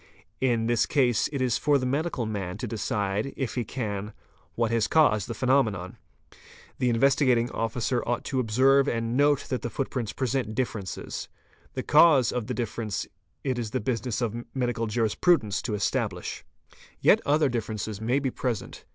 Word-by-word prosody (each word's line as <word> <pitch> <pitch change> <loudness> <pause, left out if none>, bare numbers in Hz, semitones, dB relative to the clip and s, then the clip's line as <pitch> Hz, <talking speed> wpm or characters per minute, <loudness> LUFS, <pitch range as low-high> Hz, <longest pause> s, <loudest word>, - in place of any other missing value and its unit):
In 120 -3 +1
this 120 0 +2
case 125 -6 +2
it 140 -3 -1
is 125 -3 +1
for 145 -1 +3
the 130 - -2
medical 140 -1 -1
man 100 -4 -4
to - - -4
decide, 105 +1 -2
if 135 -4 -2
he 125 - -1
can, 105 -3 -4 0.4
what 115 -1 0
has 115 -2 +2
caused 110 -11 +3
the - - -5
phenomenon. 110 -9 +1 0.8
'The 125 -1 +2
Investigating 125 -1 +3
Officer 120 +2 -1
ought 120 0 -1
to 130 - -2
observe 130 +4 +4
and 115 0 -1
note 145 +1 +4
that 130 - -1
the 120 - -3
footprints 125 -4 -3
present 125 -4 -2
differences. 110 -7 -4 0.5
The - - -2
cause 150 -5 +5
of 120 -3 -3
the 125 - -3
difference 110 -3 -3 0.4
it 130 -3 -1
is 115 -3 -3
the 130 - -1
business 120 +1 -2
of 120 0 -2
medical 120 -3 -1
jurisprudents 110 - +2
to 110 - -2
establish. 100 0 -2 0.6
Yet - - +5
other 150 +1 +3
differences 110 -3 -3
may 120 +4 +1
be 135 -2 -1
present.. 120 -5 -4
120 Hz, 165 wpm, -27 LUFS, 110-130 Hz, 0.8 s, cause